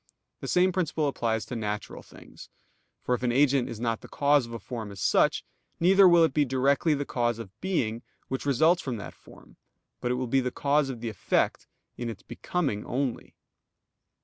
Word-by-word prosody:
The - - -6
same 180 +1 +3
principle 160 -4 -1
applies 115 -5 -1
to 125 - -6
natural 105 -2 -4
things. - - -14 0.5
For 125 - 0
if 125 - -1
an 125 -1 +1
agent 135 0 +3
is 115 - -7
not 115 -1 -1
the - - -11
cause 145 -3 +2
of - - -11
a 115 - -4
form 110 -1 -7
as 100 - -10
such, - - +2 0.3
neither 190 +3 +6
will 170 -1 +6
it 160 -5 +2
be 150 - +3
directly 140 +4 +2
the 145 0 -3
cause 120 -3 -1
of 110 0 -11
being 120 - -1 0.3
which 130 - -3
results 160 +6 +3
from 130 -8 -4
that 100 - -8
form; - - -18 0.4
but 125 - -2
it 125 - +1
will 130 +1 -2
be 135 +3 +2
the 125 - -1
cause 140 +2 +1
of 120 -4 -6
the 115 - -3
effect, 105 - -1 0.3
in 120 -1 -4
its 110 -4 -8
becoming 140 -13 -3
only. 130 -1 -3
130 Hz, 200 wpm, -27 LUFS, 115-145 Hz, 0.5 s, neither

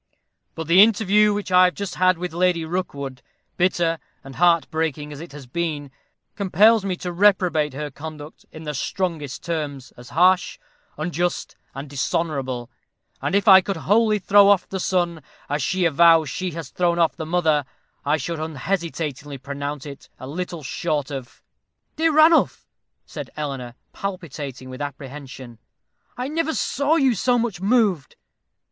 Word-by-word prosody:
But 160 - -5
the 170 +4 +6
interview 210 -1 +4
which 205 -2 -3
I 180 0 +7
have 180 - 0
just 200 -2 -4
had 185 -1 +3
with 180 -1 -5
Lady 175 -1 +1
Rookwood 140 -6 -4 0.3
bitter 170 -2 +1 0.2
and 135 -1 -11
heart 170 -2 +4
breaking 155 -2 -2
as 145 - -9
it 170 - -10
has 140 -2 -10
been 145 0 -3 0.4
compels 210 +2 +4
me 190 -2 -1
to 180 0 -5
reprobate 175 -7 +2
her 150 +1 -5
conduct 150 +1 -9
in 155 - -10
the 150 -1 -4
strongest 160 -2 -3
terms, 145 -6 -4
as 125 0 -12
harsh, 180 +2 +3 0.4
unjust, 175 +3 -2 0.2
and 135 +2 -6
dishonorable; 135 -3 -2 0.5
and - - -1
if 200 +2 +1
I 190 -1 +9
could 190 0 -3
wholly 215 +5 +2
throw 200 0 +5
off 200 -3 +3
the 190 - -4
son, 175 -3 0 0.3
as 145 +1 -1
she 185 +6 0
avows 165 -2 +5
she 185 +4 -3
has 165 -1 -7
thrown 175 -1 +1
off 165 -2 +2
the - - -5
mother, 160 -4 +2 0.4
I 145 +2 +1
should 165 0 -4
unhesitatingly 155 -2 -3
pronounce 140 +1 -5
it 140 -2 -10
as 130 - -8
little 170 0 -5
short 145 +2 -2
of 135 -1 -8 0.2
" - - -53
"Dear 325 +1 +3
Ranulph," 315 +2 +4 0.4
said - - -8
Eleanor, 135 -5 -5 0.2
palpitating 150 -9 -6
with 130 - -8
apprehension, 135 -4 -8 0.6
"I 250 +1 -3
never 320 +1 -1
saw 285 +4 +1
you 270 -6 +3
so 245 +4 +1
much 225 -6 -2
moved." 200 - +1
165 Hz, 160 wpm, -22 LUFS, 145-190 Hz, 0.6 s, I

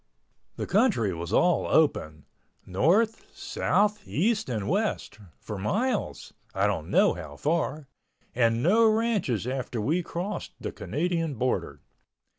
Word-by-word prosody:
The - - -4
country 190 - +2
was 85 +1 -6
all 175 +9 +3
open—north, 155 - 0
south, 210 0 0
east 215 - 0
and 110 -5 -2
west—for 105 - -3
miles 215 - -2 0.2
(I - - +2
don't - - -1
know - - +4
how 80 -4 -8
far) 155 - -1 0.5
and 115 -1 +2
no 220 +6 +5
ranches 215 - 0
after 125 -2 -3
we 155 +12 +1
crossed 175 +4 -5
the - - -4
Canadian 165 -1 -2
border. 125 +2 -2
160 Hz, 115 wpm, -27 LUFS, -, 0.5 s, no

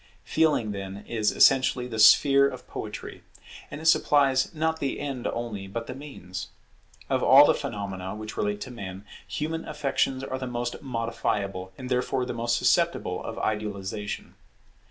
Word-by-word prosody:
Feeling, 150 -9 +1
then, 100 0 -6
is 110 -2 +1
essentially 130 -2 +4
the 110 -3 -5
sphere 140 +5 +7
of - - -10
Poetry. - - -7 0.5
And 145 - -7
it 160 - -9
supplies 140 -4 +4
not 160 0 -1
the 140 - -2
end 135 -4 -3
only, 110 -5 -4
but 115 +4 -5
the 130 - -6
means. 125 -10 -8 0.6
Of - - 0
all - - +8
the - - +4
phenomena 95 -2 -5
which 110 0 -7
relate 105 0 -1
to 130 - -6
man, 95 -4 -8 0.2
human 160 +2 -3
affections 135 -1 -1
are 130 -1 -4
the 130 - -4
most 120 0 -3
modifiable, 110 -7 -2
and 130 - -7
therefore 125 0 0
the 125 - -4
most 115 0 0
susceptible - - +1
of - - -6
idealization. 105 -1 -3
120 Hz, 155 wpm, -26 LUFS, 105-135 Hz, 0.6 s, all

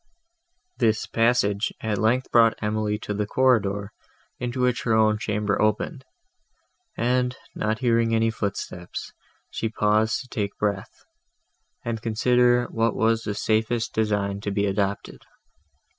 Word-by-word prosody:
This 110 -3 +2
passage 115 -3 +1
at 105 -3 -2
length 120 +4 +1
brought 115 -1 +5
Emily 105 0 -1
to 105 - -5
the 105 0 -2
corridor, 105 -6 +1 0.5
into 125 +1 -3
which 125 -1 +1
her 115 -2 +1
own 110 -1 +3
chamber 105 -1 -1
opened, 120 - 0 0.9
and, 125 +1 +1 0.2
not 110 +1 -1
hearing 115 -1 +3
any 115 0 +2
footstep, 100 -4 -5 0.6
she 115 - -2
paused 110 +1 +1
to 130 - -12
take 105 -5 -3
breath, 100 -2 -3 0.8
and 115 -2 -3
consider 120 +2 +3
what 115 0 +1
was 115 0 +2
the 105 -3 -4
safest 110 +2 0
design 100 -2 0
to 105 - -3
be 100 0 0
adopted. 100 0 -2
110 Hz, 130 wpm, -24 LUFS, 105-115 Hz, 0.9 s, brought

